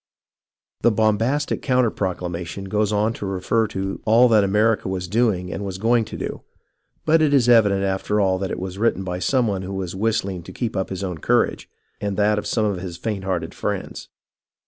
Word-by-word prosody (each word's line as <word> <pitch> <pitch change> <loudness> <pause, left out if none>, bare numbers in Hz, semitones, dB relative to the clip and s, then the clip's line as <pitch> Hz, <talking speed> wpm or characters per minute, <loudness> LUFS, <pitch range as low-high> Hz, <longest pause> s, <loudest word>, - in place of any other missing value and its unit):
The - - +5
bombastic 115 +6 +1
counter 125 -4 +2
proclamation 90 -1 -4
goes 105 +2 0
on 105 +2 +1
to 105 - -6
refer 95 +4 0
to 95 -1 -4
all 115 +3 +5
that 110 -3 +5
America 105 +2 +2
was 90 -1 -3
doing 100 -3 0
and 100 - -4
was 95 -2 -4
going 115 +2 +2
to - - -8
do, - - -5 0.6
but 160 +1 +4
it 145 -2 +4
is 125 -3 +3
evident 105 -5 +5
after 95 +2 0
all 95 -2 +2
that 95 -1 -2
it - - -3
was 95 +1 -6
written 110 -4 +1
by 90 -1 -4
some 125 +5 +2
one 100 -4 -1
who 95 +1 -5
was 95 -1 -4
whistling 100 -3 -1
to - - -11
keep 120 -4 -3
up 95 -1 -1
his 95 0 -4
own 90 -4 -4
courage - - +1 0.3
and 100 -2 -2
that 105 0 +3
of - - -6
some 110 -2 +1
of 100 -4 -1
his 90 -2 -6
faint 100 0 -4
hearted 85 -4 -2
friends. - - -4
100 Hz, 205 wpm, -22 LUFS, 95-115 Hz, 0.6 s, The